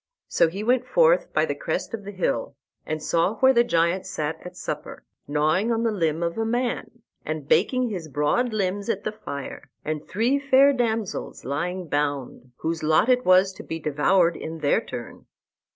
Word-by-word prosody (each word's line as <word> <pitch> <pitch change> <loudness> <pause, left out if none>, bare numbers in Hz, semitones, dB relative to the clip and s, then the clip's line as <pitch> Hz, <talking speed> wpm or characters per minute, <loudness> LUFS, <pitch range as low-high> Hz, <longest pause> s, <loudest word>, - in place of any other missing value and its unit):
So - - +3
he 190 +6 -5
went 250 +2 +2
forth - - +3
by - - +2
the - - -2
crest - - -3
of 210 -3 -5
the 205 - -6
hill, 190 -2 -2 0.3
and 155 0 -3
saw 170 +7 +1
where 265 +4 +5
the 235 -1 +5
giant 170 -4 +1
sat 155 +1 -3
at 180 0 -10
supper, 150 -4 -6 0.2
gnawing 155 +9 +1
on 230 0 0
the 230 - +2
limb 165 -5 0
of 170 +5 -2
a - - +1
man, 240 0 -2 0.2
and 155 -2 -4
baking 250 - +2
his 175 -6 -5
broad 150 - +1
limbs 200 0 -2
at 205 -3 -1
the 215 - -2
fire, 140 -10 -7 0.2
and 155 -1 -3
three 240 +8 +1
fair 275 0 +5
damsels 225 -5 -2
lying 175 +7 -3
bound, 145 -4 -2
whose 165 0 -2
lot 155 +9 +3
it 250 0 +3
was 185 +1 +5
to - - -10
be 160 - -5
devoured 165 +3 +2
in 160 +1 -6
their 150 -2 +2
turn. - - -8
185 Hz, 185 wpm, -24 LUFS, 155-230 Hz, 0.3 s, where